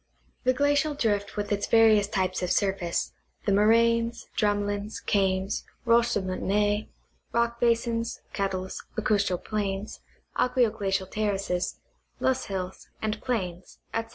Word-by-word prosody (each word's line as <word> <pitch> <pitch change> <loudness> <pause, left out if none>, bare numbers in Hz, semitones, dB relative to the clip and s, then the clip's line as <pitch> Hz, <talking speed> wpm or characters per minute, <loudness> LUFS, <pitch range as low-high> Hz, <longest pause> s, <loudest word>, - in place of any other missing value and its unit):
The 255 - +5
glacial 290 +2 +2
di 235 -6 +1
ift 205 -1 -1
with 205 0 -2
its 205 0 0
various 220 -3 +5
types 185 -2 -1
of 180 - -1
surface, 190 -3 0 0.3
the 205 - +2
moraines, 230 +3 +3
drumlins, 205 0 0
kames, 190 -1 +1 0.2
roches 235 0 +4
de 205 - +1
moutonnees, 205 +3 0 0.4
rock 235 0 +1
basins, 230 -1 +1
kettles, 190 -2 -2 0.2
lacus 200 -2 +2
tral 180 -1 -2
plains, 205 -1 -3 0.4
aqueo 250 -3 +2
glacial 195 -1 0
terraces, 195 -3 -1 0.4
loess 260 0 +1
hills 190 -1 -5
and 215 0 -2
plains, 185 -8 -3 0.2
etc. 225 0 -2
205 Hz, 130 wpm, -27 LUFS, 195-230 Hz, 0.4 s, The